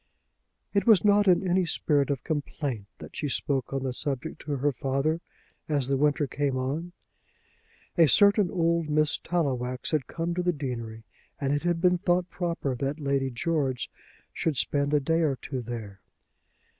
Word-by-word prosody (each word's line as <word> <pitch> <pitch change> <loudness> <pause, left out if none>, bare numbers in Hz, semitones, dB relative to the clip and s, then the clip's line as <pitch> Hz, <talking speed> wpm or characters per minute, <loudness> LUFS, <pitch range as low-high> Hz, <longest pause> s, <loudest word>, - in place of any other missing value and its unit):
It 200 +3 +1
was 215 -4 +6
not 205 0 +5
in 185 +1 +4
any 180 +1 +3
spirit 150 -4 +1
of 140 -3 -2
complaint 145 - -3
that - - -11
she 150 - -2
spoke 135 -1 -1
on 135 -1 -2
the 130 -1 -2
subject 145 +4 -3
to 145 -1 -3
her 145 +3 +1
father 140 +5 -1 0.5
as 140 -4 +1
the 140 - +2
winter 145 +2 +2
came 140 -1 -1
on. 145 +7 -3 1.1
A 165 - +8
certain 200 - +5
old 170 -2 +1
Miss 155 +1 +3
Tallowax 130 -7 -1
had 150 -5 0
come 170 +1 -3
to 180 - -1
the 180 0 +1
deanery, 115 -6 -5 0.4
and 140 0 0
it 145 - 0
had 175 -1 0
been 180 -1 +3
thought 180 -1 +1
proper 170 -6 -2
that 140 +4 -2
Lady 140 -2 0
George 135 -1 -1 0.4
should 155 -5 -1
spend 140 +2 +1
a 150 - +4
day 165 +4 +1
or 150 -4 +2
two 130 +1 -5
there. 110 -4 -7
145 Hz, 170 wpm, -27 LUFS, 135-170 Hz, 1.1 s, A